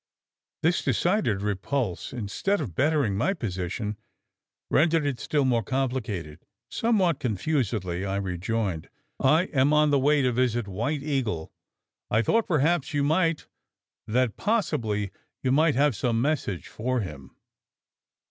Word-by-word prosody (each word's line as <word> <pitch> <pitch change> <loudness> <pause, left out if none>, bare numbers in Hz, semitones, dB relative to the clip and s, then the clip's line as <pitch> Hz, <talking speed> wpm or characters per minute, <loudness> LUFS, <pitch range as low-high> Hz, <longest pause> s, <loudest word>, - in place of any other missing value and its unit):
This 170 +3 +2
decided 140 - +1
repulse, 105 +1 -2
instead 125 - -1
of 125 - -4
bettering 140 - +1
my 190 - +1
position, 105 - -3 0.7
rendered 160 0 +3
it 135 -4 -1
still 145 -3 0
more 120 -3 +2
complicated. 115 - -3 0.3
Somewhat 190 - +2
confusedly, 105 - -1
I 100 0 -2
rejoined: 95 -1 -2 0.3
"I 155 +6 +4
am 140 +1 +3
on 150 -1 +4
the 140 - +4
way 145 +1 +3
to 125 - +2
visit 120 -2 +1
the 100 - -9
White 135 +9 -2
Eagle. 120 - -2 0.6
I 110 +2 +2
thought 225 - +2
perhaps 155 -1 +1
you 145 - +2
might 165 +2 +1 0.6
that 120 0 +1
possibly 110 - 0 0.3
you 130 - +2
might 155 +2 +4
have 140 -1 +3
some 115 +3 0
message 125 - -1
for 125 +2 -2
him." 75 -8 -8
130 Hz, 135 wpm, -26 LUFS, 105-150 Hz, 0.7 s, I